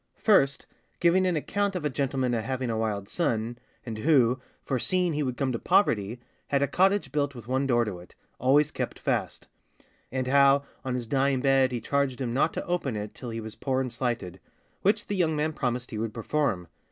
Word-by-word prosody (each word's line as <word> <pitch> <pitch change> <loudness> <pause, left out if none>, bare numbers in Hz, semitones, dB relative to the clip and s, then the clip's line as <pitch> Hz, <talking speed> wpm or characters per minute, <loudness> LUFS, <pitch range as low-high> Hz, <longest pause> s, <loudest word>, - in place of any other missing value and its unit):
First, 140 -10 +3 0.3
giving 180 +2 +4
an 180 - +1
account 200 +6 -1
of 170 -4 -3
a - - +2
gentlemen 130 -2 0
a 115 - 0
having 130 +1 -2
a 110 - -1
wild 105 -3 -2
son, 120 - -1 0.3
and 110 -3 -5
who, 130 -3 +3 0.2
foreseeing 175 +6 +1
he 150 - -1
would 130 -3 -2
come 135 -2 0
to 115 - -2
poverty, 115 - +2 0.3
had 140 0 +2
a - - +2
cottage 190 -4 +2
built 140 -1 -1
with 120 -2 -10
one 130 +2 0
door 120 -2 +3
to 95 -4 -5
it, 90 - -15 0.2
always 145 +4 +4
kept - - -4
fast; - - -2 0.6
and 130 0 -1
how, 140 +1 +5 0.2
on 130 -2 -2
his 125 -2 -3
dying 135 +2 +1
bed, 135 -1 +3
he 120 - -2
charged 135 +2 0
him 120 -3 -2
not 140 +5 +2
to - - -4
open 170 -9 -1
it 105 0 -5
till 125 - -8
he 115 0 -4
was 110 -1 -6
poor 130 -1 -1
and 130 -2 -2
slighted, 115 -7 -3 0.4
which 210 +2 +2
the 205 - -3
young 165 -4 +1
man 155 +1 0
promised 125 -3 -2
he 110 - -4
would 110 0 -3
perform. 115 -6 -1
130 Hz, 210 wpm, -27 LUFS, 120-150 Hz, 0.6 s, how